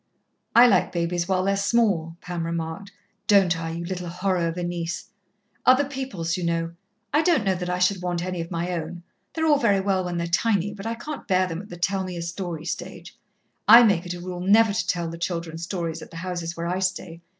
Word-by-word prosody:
"I 240 +1 +9
like 235 - +3
babies 170 0 -1
while 185 -1 +1
they're 195 +1 +2
small," 200 -6 +1
Pam 175 -2 -4
remarked. 165 +4 -4 0.4
"Don't 195 -4 +5
I, 165 0 -4
you 170 +1 -4
little 180 0 -4
horror 180 0 0
of 165 +1 -4
a 175 - -2
niece? 175 -1 -4 0.5
Other 260 +3 +5
people's, 255 - -3
you 180 - -4
know. 165 0 -1 0.4
I 300 - +5
don't 325 - +3
know 195 -2 +2
that 180 -1 -4
I 180 - 0
should 180 +1 +2
want 175 -1 -2
any 180 -2 -3
of 165 - -6
my 175 +1 -2
own 170 0 -5 0.3
they're 320 0 0
all 295 -3 +4
very 205 -7 +3
well 190 -1 +1
when 175 -1 -3
they're 170 - -1
tiny, 200 +2 +1
but 200 +1 -7
I 230 - -2
can't 300 +6 -7
bear 185 -2 +3
them 170 -1 -4
at 205 - -13
the 175 - -8
tell 190 +2 0
me 180 -2 -5
a 170 - -4
story 170 -2 -5
stage. - - -6 0.5
I 240 - +10
make 185 -6 +2
it 175 - -4
a - - -8
rule 180 0 -6
never 210 +3 +5
to - - -1
tell 175 -2 0
the 165 0 -7
children 170 -2 -3
stories 170 -2 -4
at - - -10
the 165 - -10
houses 170 -1 -4
where 165 - -3
I 180 +2 -1
stay. 185 -3 -3
180 Hz, 230 wpm, -24 LUFS, 170-200 Hz, 0.5 s, I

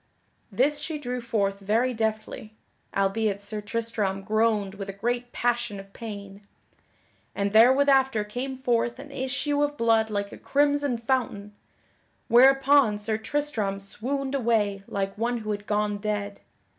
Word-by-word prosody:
This 280 +8 +1
she 310 +1 -3
drew 250 -3 -4
forth 200 -4 -1
very 225 +6 +1
deftly 220 -1 -3 0.4
(albeit 200 +1 +1
Sir 210 +1 -5
Tristram 210 -3 -2
groaned 215 -2 +1
with 200 0 -7
a - - -4
great 240 +4 -2
passion 235 -4 -1
of 195 0 -13
pain) 200 -3 -8 0.9
and 200 0 -1
therewithafter 265 0 +5
came 260 +5 -4
forth 240 -2 0
an 285 +2 -10
issue 275 +2 -1
of 290 0 0
blood 225 -1 +3
like 200 -1 -2
a - - -10
crimson 285 -2 +1
fountain, 230 -4 -2 0.8
whereupon 270 -2 +5
Sir 215 +1 -2
Tristram 220 -6 -2
swooned 265 +8 -4
away 220 -6 +1
like 195 0 -3
one 240 +1 0
who 215 -2 -4
had 205 0 -5
gone 210 -1 0
dead. 205 -1 -3
225 Hz, 140 wpm, -26 LUFS, 205-260 Hz, 0.9 s, therewithafter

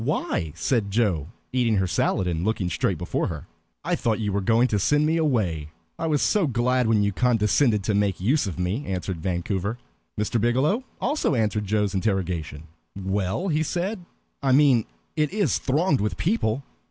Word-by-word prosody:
"Why?" 80 - -1
said 100 +5 0
Joe, 100 -9 +1 0.3
eating 120 -4 +2
her 95 -1 +2
salad 90 +1 0
and 85 -2 -1
looking 100 -4 -1
straight - - 0
before - - -2
her. - - -6 0.4
"I - - 0
thought 115 -2 0
you 105 -3 -1
were 100 - 0
going 115 +5 +3
to 105 - +1
send 145 +9 +3
me 160 +2 +2
away. 100 - 0 0.3
I 165 - -1
was 150 -3 +1
so 200 -6 +2
glad 125 0 +1
when 110 -2 +3
you 100 - +1
condescended 115 0 +2
to 105 - 0
make 100 -2 +1
use 120 +6 +1
of 90 - -5
me," 90 +9 -1
answered 90 -2 -3
Vancouver. 95 +5 -2 0.4
Mr. 105 +2 0
Biggielow 130 - +2 0.2
also 290 - 0
answered 105 -2 0
Joe's 105 -1 0
interrogation. 90 -6 -2 0.3
"Well," 95 - -1
he 155 -1 +1
said, 180 +5 -2 0.4
"I 135 -2 +2
mean 135 -5 +5 0.3
it 155 -2 +1
is 205 0 +1
thronged 145 - +1
with 105 -3 -1
people. 140 - 0
110 Hz, 175 wpm, -24 LUFS, 95-140 Hz, 0.4 s, mean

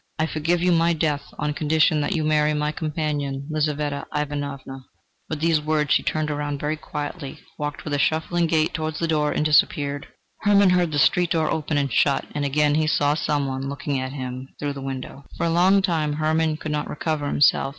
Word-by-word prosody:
I 160 - +1
forgive 165 +2 0
you 180 - +3
my 170 0 +3
death, 150 -3 0 0.2
on 150 0 -1
condition 155 0 +2
that 180 +6 -1
you 160 - 0
marry 150 0 +2
my 150 0 0
companion, 150 -3 -3
Lizaveta 150 -2 -1
Ivanovna." 140 -3 -4 0.4
With 155 -1 -4
these 165 -2 +3
words 150 -2 +1
she - - +3
turned 155 -1 -1
round 145 -1 -3
very 150 +2 -1
quietly, 150 -1 -6 0.2
walked 150 -1 -4
with 150 - -3
a 145 - +1
shuffling 165 +3 +1
gait 160 -1 +1
towards 155 -1 -3
the 165 - -1
door 150 -2 +1
and 150 - 0
disappeared. 145 -1 +2 0.3
Hermann 200 -2 +4
heard 180 -2 +2
the 145 - -1
street 175 +4 +3
door 160 -2 +1
open 155 -1 -1
and 140 -4 0
shut, 140 -2 +2
and 145 - -2
again 145 +1 +2
he 155 +1 +2
saw 145 -1 +2
some 150 -2 0
one 135 0 -3
look 140 +7 -7
in 140 -2 +1
at 130 +1 -4
him 130 -1 -5
through 145 -1 -3
the 140 - -8
window. 135 +1 -6
For - - 0
a 165 - +1
long 190 +3 +4
time 160 -5 0
Hermann 155 +1 +1
could 155 -1 -5
not 150 0 -2
recover 150 -1 -2
himself. 145 -1 +3
150 Hz, 210 wpm, -23 LUFS, 145-160 Hz, 0.4 s, Hermann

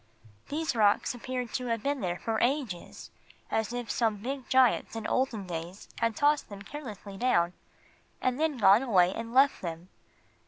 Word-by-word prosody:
These 310 -2 -1
rocks 210 0 +3
appeared 250 0 -5
to 250 -1 -2
have 230 -2 -1
been 280 -1 -1
there 175 -2 -1
for 220 +2 -2
ages, 245 - -2 0.4
as 220 +1 0
if 245 -2 -4
some 225 -3 +1
big 260 +5 -5
giants 260 -3 +3
in 225 -1 -5
olden 240 -6 0
days 175 +2 -6
had 230 -1 +1
tossed 290 0 +2
them 200 -1 -9
carelessly 210 -7 -8
down 180 -7 +2 0.7
and 255 +1 0
then 315 -3 +1
gone 205 0 +6
away 190 -8 +3
and 230 0 -6
left 270 +3 +4
them. 170 0 -6
230 Hz, 165 wpm, -29 LUFS, 200-260 Hz, 0.7 s, gone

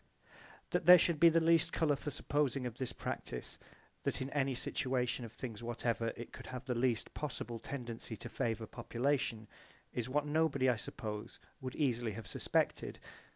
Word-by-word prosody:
That - - +1
there 180 +1 +12
should 170 -2 +2
be 170 +1 +9
the 165 +1 +4
least 165 0 +5
colour 155 -4 +2
for 145 - -4
supposing 140 -2 0
of 120 -1 -5
this 130 -2 -1
practise - - -5 0.4
that - - 0
in 130 +1 -3
any 135 -2 +1
situation 125 -1 -1
of 115 - -9
things 115 -4 -6
whatever 115 -1 -1
it 120 - -8
could - - -9
have 125 0 -6
the 130 - 0
least 120 -1 +1
possible 120 -5 -4
tendency 120 -4 -5
to - - -7
favour 115 -1 -1
population 120 -1 -1 0.5
is 120 0 -2
what 145 +2 +1
nobody 150 -3 +2
I 125 - +4
suppose 105 +1 -5 0.2
would 130 -1 -5
easily 120 -6 +1
have 110 +1 -7
suspected. 90 - 0
125 Hz, 170 wpm, -35 LUFS, 115-145 Hz, 0.5 s, there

